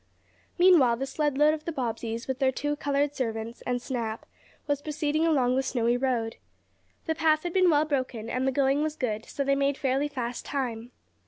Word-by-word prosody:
Meanwhile 335 -10 +6
the 270 - -2
sled 295 0 -1
load 300 +1 +5
of 310 -1 -6
the 335 - -2
Bobbseys 230 -4 -3
with 260 -1 -3
their 265 -1 +3
two 290 +3 -2
colored 285 0 0
servants, 230 -3 -4
and 245 0 0
Snap 235 -3 -4 0.4
was 285 -1 -1
proceeding 305 +1 0
along 255 -6 +2
the 265 - +2
snowy 240 -2 +1
road. 245 -3 -1 0.7
The 320 - 0
path 310 -1 +2
had 350 -1 -3
been 370 -2 +4
well 300 -1 +4
broken, 255 -6 -2
and 255 +3 -1
the - - +3
going 275 +1 +2
was 310 0 -1
good, 220 -6 -2
so 280 - -3
they 275 0 +2
made 280 0 +1
fairly 270 +2 0
fast 245 -4 -4
time. 245 -4 -4
270 Hz, 195 wpm, -27 LUFS, 245-295 Hz, 0.7 s, Meanwhile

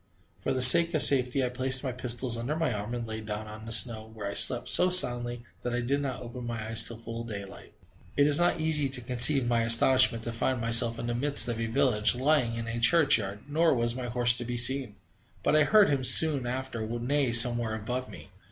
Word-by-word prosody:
For - - -8
the 130 -1 -1
sake 165 +6 +8
of 155 - +5
safety, 130 -1 +2
I - - -6
placed 130 +1 +2
my 130 - -6
pistols 125 0 -4
under 120 +6 -7
my 160 -6 -5
arm 105 +3 -9
and 120 -1 -8
lay 110 0 -9
down 105 0 -9
on 110 +1 -14
the - - -10
snow, 110 -1 +1
where 110 -2 -12
I 100 - -7
slept - - +3
so 180 - +3
soundly 120 -9 +1 0.2
that 120 0 -7
I 120 - -5
did 140 +4 -4
not 130 -3 -8
open 120 +1 -12
my 115 -1 -8
eyes 110 +1 +2
till 115 - -2
full 115 0 -11
daylight. 100 -4 -13 0.4
It 145 - +1
is 145 +1 +1
not 175 -1 -2
easy 155 -3 -1
to 130 -1 -5
conceive 125 +2 +3
my 120 -1 -3
astonishment 115 +1 +3
to 115 - -7
find 120 +2 -5
myself 115 0 +2
in 115 - -9
the 120 - -6
midst 140 +3 -1
of 115 -1 -7
a 115 - -6
village, 105 0 -2
lying 130 -3 -3
in 115 0 -8
a 115 +1 -7
church 145 +1 +2
yard, 100 0 -10
nor 160 +1 -2
was 120 -1 -4
my 125 0 -9
horse 120 0 +1
to - - -7
be 120 0 -8
seen, 125 -2 0 0.5
but - - -2
I 155 -1 +1
heard 210 -1 +1
him 140 -2 -4
soon 135 0 +3
after 130 -1 -8
neigh 120 +3 -4
somewhere 120 -1 +4
above 125 +4 -8
me. - - -16
120 Hz, 235 wpm, -24 LUFS, 115-135 Hz, 0.5 s, sake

